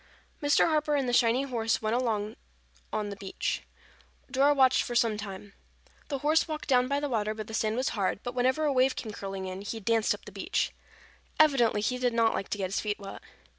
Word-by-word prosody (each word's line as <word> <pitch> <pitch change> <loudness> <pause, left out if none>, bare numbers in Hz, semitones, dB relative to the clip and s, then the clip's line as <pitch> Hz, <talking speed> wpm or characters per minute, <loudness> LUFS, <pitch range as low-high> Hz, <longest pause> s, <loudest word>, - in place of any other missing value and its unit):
Mr. 290 0 +4
Harper 305 -2 +1
and 275 -3 0
the 245 - -1
shiny 240 +2 +4
horse 230 -4 0
went 220 +1 0
on 220 -3 -1 0.6
along 210 -1 -2
the - - -5
beach. 195 -1 -3 0.7
Dora 275 +2 +4
watched 265 -2 +4
for 240 - -4
some 230 -2 +3
time. 200 -1 -8 0.5
The 280 - -2
horse 315 +2 +3
walked 310 -1 -5
down 250 -2 +4
by 280 +2 0
the 290 - -2
water 215 -4 -1
where 215 - -4
the 220 - -10
sand 220 0 0
was 255 +2 0
hard, 195 -3 -1
but 245 - -4
whenever 255 +5 +1
a 290 - +2
wave 260 0 +3
came 220 - -5
curling 195 -2 -5
in, 185 +1 -5
he 225 +3 -5
danced 225 +1 +2
up - - -17
the - - -9
beach. - - -1 0.7
Evidently 255 -9 +4
he 250 +4 -1
did 245 -2 0
not 230 -1 +3
like 195 - -3
to - - -2
get 190 -2 -3
his - - 0
feet 210 -1 -2
wet. 195 -1 -8
230 Hz, 220 wpm, -29 LUFS, 210-265 Hz, 0.7 s, Mr